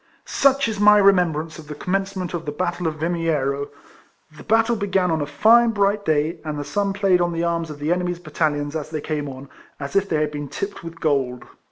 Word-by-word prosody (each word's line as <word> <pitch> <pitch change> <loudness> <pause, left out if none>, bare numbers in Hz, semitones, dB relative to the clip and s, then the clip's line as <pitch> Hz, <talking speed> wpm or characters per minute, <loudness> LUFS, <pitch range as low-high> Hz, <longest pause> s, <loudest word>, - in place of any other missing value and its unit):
Such 275 -1 +2
is 215 -3 -3
my 210 0 +7
remembrance 170 -6 +2
of 155 - -12
the 150 - -7
com 180 +5 -4
mencement 195 -2 -2
of 170 -1 -4
tlie 145 0 -5
battle 175 -1 -1
of 155 - -2
Yimiero. 150 -5 -1 0.7
The - - -12
battle 225 +1 +2
began 195 -4 0
on 160 -1 0
a 145 - -2
fine 225 +10 +5
bright 205 -1 +1
day, 155 +2 +1
and 155 -2 -4
the 145 - -3
sun 200 +7 -1
played 195 -3 +2
on 175 0 0
the 165 0 -1
arms 170 -1 -1
of 150 - -7
the 150 +3 -2
enemy's 180 0 -2
battalions, 150 -4 -2
as 155 -2 -4
they 155 -1 -3
came 150 -1 -3
on, 135 +1 -9 0.3
as 140 +5 -6
if 195 0 +2
they 155 - +1
had 150 -1 0
been 145 -1 -5
tipped 200 +8 -5
with 165 0 -9
gold. 135 -6 0
165 Hz, 225 wpm, -22 LUFS, 150-195 Hz, 0.7 s, my